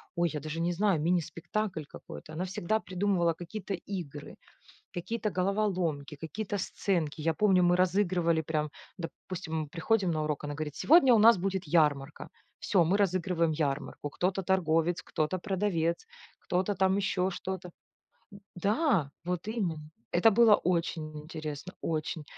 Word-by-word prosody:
ой, 170 -1 +2
я 150 - -2
даже 155 +3 -5
не 170 +1 +1
знаю, 195 -2 +2
мини-спектакль 175 +3 -1
какой-то. 155 - -11
Она 175 +4 -2
всегда 190 +3 -1
придумывала 185 -3 +1
какие-то 190 +4 -5
игры, 170 -6 -7 0.6
какие-то 215 +5 -2
головоломки, 185 -7 -1
какие-то 190 +8 -4
сценки. 170 -5 -1
Я 160 +1 +1
помню, 190 -1 +4
мы 175 0 +4
разыгрывали 180 -3 +2
прям, 155 -1 -2 0.3
допустим, 160 -2 -5
приходим 185 +5 +1
на 155 - -1
урок, 150 -1 -2
она 145 0 -3
говорит: 150 -1 -5
"Сегодня 290 -5 +6
у 230 - +6
нас 225 +2 +7
будет 190 +1 -2
ярмарка". 150 -2 +1 0.3
Всё, 190 -5 +3
мы 180 +5 +2
разыгрываем 180 -4 +1
ярмарку: 145 -1 -2
кто-то 185 +5 -1
торговец, 170 -2 +1
кто-то 155 +4 -1
продавец, 185 - -1 0.3
кто-то 185 +3 -1
там 190 0 +2
еще 190 -2 0
что-то. 190 0 -5 0.7
М-да! 200 - 0
Вот 180 +2 -3
именно. 170 -9 -3 0.2
Это 215 +6 +5
было 220 -1 +7
очень 165 -3 -1
интересно, 155 +2 -6
очень. 155 -1 -2
175 Hz, 140 wpm, -30 LUFS, 160-195 Hz, 0.7 s, нас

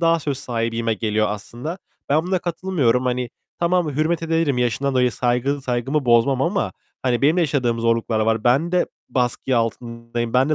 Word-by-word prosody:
daha 165 0 +3
söz 140 -3 -2
sahibiyime 115 -1 -1
geliyor 110 -1 0
aslında. 120 - -6 0.3
Ben 150 +3 +3
buna 185 0 +1
katılmıyorum. 165 -8 0
Hani, 125 -1 -1 0.3
tamam 170 -2 +1
hürmet 160 +2 +1
ederim 165 -5 +1
yaşından 125 +3 0
dolayı 125 -2 +3
saygı 125 +5 0
saygımı 130 +3 -1
bozmam 125 +3 +3
ama, 195 +3 0 0.3
hani 125 -1 0
benim 150 +5 +4
de 180 - +3
yaşadığım 125 -7 +1
zorluklar 115 -1 +1
var. 110 0 +1
Ben 140 +8 +3
de 180 - +3 0.2
baskı 125 0 0
altındayım, 115 0 -3
ben 130 +3 +3
de 155 - +3
125 Hz, 170 wpm, -22 LUFS, 115-155 Hz, 0.3 s, benim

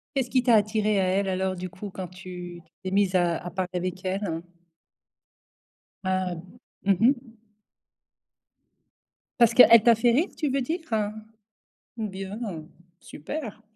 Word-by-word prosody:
Qu'est-ce 260 -3 0
qui 255 0 +3
t'a 240 -2 +4
attiré 210 -1 +1
à - - +2
elle, 195 +1 +1
alors 190 0 -1
du 185 0 -6
coup, 200 +4 -8
quand 185 -1 -6
tu 180 -1 -9 0.2
t'es 185 - -4
mise 195 -1 +2
à 175 -2 +2
à 175 - -6
parler 185 0 -3
avec 180 +1 -3
elle? 185 -3 -2 1.6
Ah. 185 -1 0 0.5
Mmh 195 -1 +3
mh. 240 -2 +1 2.0
Parce 235 -1 +5
qu'elle 230 -2 +8
t'a 235 +1 +6
fait 235 +2 +3
rire, 290 +10 +2
tu 300 -3 -1
veux 275 +1 +1
dire? 320 +8 -2 1.2
Bien. 195 -2 -5 0.6
Super. 220 - -7
195 Hz, 135 wpm, -26 LUFS, 185-230 Hz, 2.0 s, qu'elle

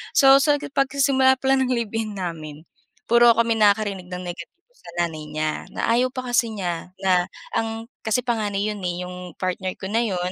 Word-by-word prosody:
So, 270 -1 +8
sa 290 +1 +3
pagsisimula 275 -1 +2
palang 265 0 +3
ng 255 - +1
live-in 225 -3 -3
namin, 160 -4 -6 0.4
puro 235 0 +7
kami 230 0 +3
nakarinig 205 -3 +2
ng 180 0 -6
negatibo 175 - -9
sa 170 - -14
nanay 160 -2 -7
niya, 155 0 -1 0.2
na - - -2
ayaw 250 +2 +2
pa 255 -1 -5
kasi 235 -1 +3
niya 180 -4 -4
na 180 -2 +3 0.3
ang 225 0 -2 0.2
kasi 220 +3 +1
panganay 210 -4 -1
'yon 205 -1 -7
eh, 180 0 -3
'yong 180 -1 -9
partner 185 0 -2
ko 190 - -8
na 230 - +2
'yon 180 -4 -2
210 Hz, 180 wpm, -23 LUFS, 180-240 Hz, 0.4 s, So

